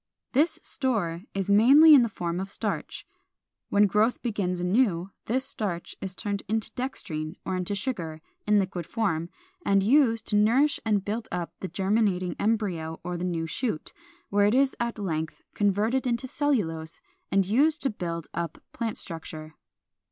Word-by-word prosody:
This 300 +5 +2
store 200 -10 -1
is 195 -1 -1
mainly 270 +10 +8
in 280 - +9
the 235 - +1
form 175 -3 -3
of 190 +1 -4
starch. - - -3 0.6
When 205 +1 +5
growth 210 +5 +2
begins 200 -6 -1
anew, 185 -1 +1
this 260 +4 0
starch 175 -6 -4
is 190 -1 -5
turned 205 0 -3
into 220 +1 -1
dextrine 160 - -4
or 190 - -1
into 185 +2 -2
sugar, 175 -9 -3 0.3
in 210 0 +5
liquid 185 -4 -1
form, 175 -8 -1 0.3
and 195 -1 +3
used 230 -1 +4
to 210 - +1
nourish 245 +8 +4
and 210 -3 +1
build 220 +2 -3
up 175 -2 -3
the 190 - -4
germinating 190 0 0
embryo 185 -8 -1
or 180 +1 -3
the 175 - -4
new 170 -3 -1
shoot, 185 - -3 0.4
where 205 0 +3
it 210 - +2
is 270 0 +3
at 235 -1 -2
length 160 -6 -3
converted 215 +6 +1
into 240 +1 -1
cellulose 190 - -1 0.3
and 195 0 +3
used 290 - +2
to 270 - +1
build 170 -5 -4
up 170 -1 -3 0.2
plant 230 -3 -3
structure. 155 -2 -6
200 Hz, 160 wpm, -27 LUFS, 175-230 Hz, 0.6 s, in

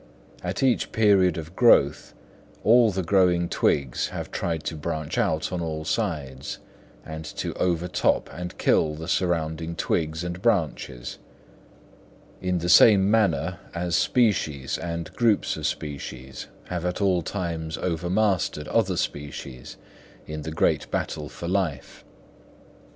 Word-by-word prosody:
At - - -2
each 130 -2 +2
period 100 -6 +4
of 80 +2 -7
growth 95 - +4 0.5
all 115 0 +6
the 95 -2 -2
growing 90 -1 +3
twigs 70 -6 +1
have - - -6
tried 80 -2 -2
to - - -3
branch 80 -1 -4
out 80 +2 0
on 90 -1 -2
all 80 -1 -4
sides, 75 - -3 0.5
and 80 0 -6
to - - -4
overtop 90 -1 +1
and 90 0 -6
kill 75 -1 +2
the 80 +1 -7
surrounding 80 -2 -1
twigs 80 0 -1
and 90 +1 -5
branches, 80 - -1 1.2
in 90 -1 0
the 85 0 -2
same 100 +3 +7
manner 105 -6 +1 0.2
as 85 0 -1
species 80 - +1
and 85 -1 -5
groups 115 -4 +2
of - - -2
species 65 -3 -6 0.2
have 90 -2 -3
at 90 0 -2
all 95 -3 +2
times 85 -3 -4
overmastered 90 -2 0
other 95 -6 +1
species 70 -4 -5 0.5
in 75 0 -6
the 80 - -5
great 80 - +1
battle 75 -1 -3
for 85 - -7
life. 90 -6 -2
85 Hz, 130 wpm, -25 LUFS, 80-95 Hz, 1.2 s, same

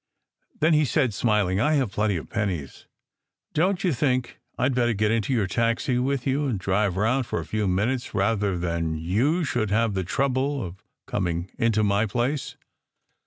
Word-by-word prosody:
Then 160 +2 +4
he 155 0 +4
said, 125 -3 +1
smiling, 100 -3 +1
"I 150 +5 +3
have 135 -8 +1
plenty 105 -3 0
of 80 - -7
pennies! 95 - -3 0.7
Don 185 +6 +2
t 190 - -1
you 170 - +2
think 130 -1 -1 0.2
I 130 - +2
d 135 - 0
better 120 -1 +2
get 105 +1 +1
into 115 +1 0
your 115 -6 +2
taxi 115 +4 0
with 135 0 -1
you, 140 +2 +1
and 120 -6 -1
drive 95 0 0
round 120 +5 +1
for - - -2
a - - -5
few 110 -2 -1
minutes 110 +7 -1
rather 100 -2 +1
than 85 -2 -1
you 115 - +1
should 120 -7 -1
have 110 +1 +2
the 95 -1 -1
trouble 135 +6 0
of 90 +2 -10 0.2
coming 85 +1 -2
into 115 -3 +2
my 100 +2 +2
place?" 125 +6 -2
115 Hz, 185 wpm, -25 LUFS, 100-130 Hz, 0.7 s, Then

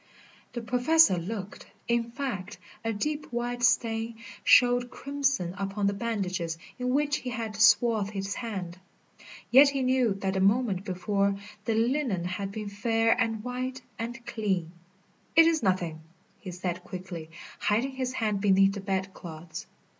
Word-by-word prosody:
The 240 - -4
Professor 250 - +4
looked. 195 +2 -6 0.2
In 235 0 +1
fact, 240 -9 -4 0.3
a 225 - 0
deep, 295 +8 -3
wide 240 0 -2
stain 230 -1 +2 0.3
showed 245 0 +5
crimson 275 -11 -1
upon 200 +1 -2
the 200 - +2
bandages 190 -7 -2 0.2
in 250 0 -1
which 290 +3 +2
he 255 - -5
had 225 -3 -4
swathed 215 0 +4
his 200 -1 -3
hand. 190 -7 -5 0.7
Yet 275 +3 +8
he 275 -1 -1
knew 255 -5 +2
that 195 -1 -2
the 190 - 0
moment 200 -1 +2
before 200 +1 0 0.3
the 225 - +1
linen 235 - +1
had 190 +2 -3
been 215 0 -5
fair 225 +2 +2
and 225 -2 -1
white 255 +1 -4 0.2
and 235 +1 -5
clean. 190 -7 -1 0.6
"It 330 0 +8
is 325 -2 +3
nothing," 175 -5 0 0.4
he 190 - -8
said 180 0 -4
quickly, 180 -3 -7 0.3
hiding 230 +6 +1
his 260 -1 -3
hand 210 -5 -1
beneath 195 -1 +4
the 200 - -5
bed 190 0 -2
clothes. 160 -1 -8
220 Hz, 150 wpm, -28 LUFS, 190-245 Hz, 0.7 s, Yet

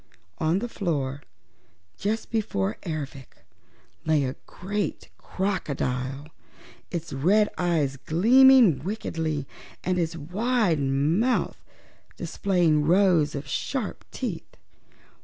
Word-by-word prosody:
On 160 +3 +2
the 235 +5 -2
floor 145 - -2 0.7
just 215 +3 -2
before 110 - -1
Ervic 140 -5 -6 0.6
lay 155 -2 +2
a 130 0 -2
great 200 +3 -4
crocodile, 140 -7 -2 0.6
its 170 -4 -5
red 195 +10 +3
eyes 160 -6 0
gleaming 230 - +5
wickedly 160 -7 -3 0.4
and 180 0 0
its 165 -1 -1
wide 190 - 0
open 140 +6 +1
mouth 250 +2 0 0.6
displaying 175 -6 +1
rows 170 -3 +3
of 140 +1 -5
sharp - - -3
teeth. - - -6
165 Hz, 100 wpm, -26 LUFS, 145-200 Hz, 0.7 s, gleaming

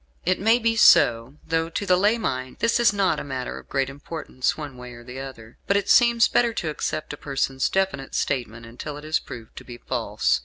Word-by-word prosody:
It 185 +2 +1
may 225 +4 +4
be 230 -1 +1
so; 120 - +5
though 165 0 0
to 200 - -3
the 185 -2 +4
lay 205 +5 +3
mind 130 - -3
this 230 +1 +1
is 235 -2 +5
not 200 -2 +1
a - - -5
matter 130 -3 -5
of - - -17
great 135 -1 0
importance 140 -1 -3
one 145 -4 -7
way 125 0 -10
or 120 0 -12
the 125 +2 -8
other; 125 -4 -10
but 200 - +3
it 200 - 0
seems 235 -2 +5
better 235 -1 +2
to 160 - -2
accept 155 0 -3
a - - -7
person's 135 -2 -1
definite 190 -9 -1
statement 120 -3 -2
until 125 +6 -7
it 150 - -10
is 155 +1 +1
proved 115 -2 -11
to - - -8
be 120 -1 -10
false. 115 - -1
145 Hz, 225 wpm, -24 LUFS, 125-195 Hz, -, so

